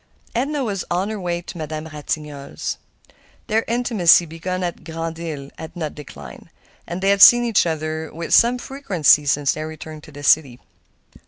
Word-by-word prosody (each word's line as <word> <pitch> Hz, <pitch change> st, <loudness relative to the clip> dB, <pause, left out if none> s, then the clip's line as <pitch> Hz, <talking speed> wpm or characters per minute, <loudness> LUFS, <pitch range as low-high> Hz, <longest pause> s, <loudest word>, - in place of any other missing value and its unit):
Edna 275 Hz, +4 st, -1 dB
was 200 Hz, -5 st, -2 dB
on 180 Hz, +4 st, -1 dB
her 215 Hz, -1 st, -4 dB
way 175 Hz, -1 st, -2 dB
to 175 Hz, -, -9 dB
Madame 155 Hz, 0 st, -5 dB
Ratignolle's. 150 Hz, -2 st, -5 dB, 0.7 s
Their 220 Hz, +1 st, +1 dB
intimacy, 225 Hz, -8 st, +4 dB
begun 180 Hz, +3 st, -4 dB
at 175 Hz, -1 st, -4 dB
Grand 165 Hz, 0 st, -5 dB
Isle, 150 Hz, -5 st, -6 dB
had 160 Hz, -, -9 dB
not 155 Hz, -4 st, -4 dB
declined, 150 Hz, -2 st, -11 dB, 0.4 s
and 175 Hz, +2 st, -5 dB
they 195 Hz, -, +4 dB
had 200 Hz, 0 st, +2 dB
seen 240 Hz, +3 st, +9 dB
each 225 Hz, -6 st, +2 dB
other 160 Hz, 0 st, -3 dB
with 165 Hz, +1 st, -4 dB
some 240 Hz, +2 st, +5 dB
frequency 185 Hz, -, +2 dB
since 140 Hz, -1 st, +2 dB
their 155 Hz, 0 st, -4 dB
return 155 Hz, 0 st, -9 dB
to 150 Hz, -, -14 dB
the 145 Hz, 0 st, -11 dB
city. 135 Hz, -4 st, +3 dB
165 Hz, 170 wpm, -21 LUFS, 155-195 Hz, 0.7 s, seen